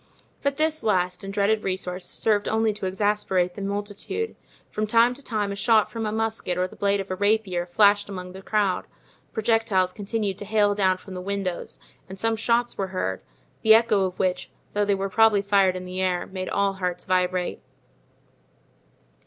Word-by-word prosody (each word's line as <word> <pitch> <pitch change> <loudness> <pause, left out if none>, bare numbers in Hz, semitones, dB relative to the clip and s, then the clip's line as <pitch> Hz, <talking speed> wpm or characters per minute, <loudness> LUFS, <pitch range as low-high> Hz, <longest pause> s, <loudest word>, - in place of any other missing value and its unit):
But 280 -1 0
this 310 0 +1
last 180 -4 0
and 195 - -5
dreaded 205 +2 +1
resource 185 -1 -3
served 210 -2 +1
only 220 0 +1
to 205 -2 -4
exasperate 190 -2 0
the 200 - -8
multitude. 205 - -3 0.4
From 215 0 -2
time 230 +3 +4
to 280 +3 -10
time 210 -5 -2
a - - -3
shot 215 +1 +3
from 225 -2 -3
a - - -2
musket 220 -5 -2
or 180 0 +1
the - - -15
blade 200 0 +1
of 195 -1 -5
a - - -1
rapier 200 -3 +1
flashed 205 +2 +4
among 180 -2 -6
the 190 - -9
crowd; 200 -2 0 0.4
projectiles 220 -5 +1
continued 205 -1 -3
to 205 - -6
hail 205 0 +3
down 190 -2 +2
from 190 +1 -11
the 180 - -5
windows 195 -2 -4 0.3
and 190 0 -9
some 225 +1 +1
shots 235 +1 0
were 195 - 0
heard, 185 - -3 0.4
the 220 0 +7
echo 220 -4 +3
of 185 -1 -4
which, 185 -1 -1 0.2
though 205 0 +1
they 200 -1 +2
were 195 0 -2
probably 210 0 +4
fired 195 -2 +3
in 185 0 -6
the 185 +1 -4
air, 180 -1 0
made 185 -1 -5
all 200 -1 +1
hearts 180 -2 -3
vibrate. 180 -1 0
200 Hz, 185 wpm, -25 LUFS, 185-220 Hz, 0.4 s, the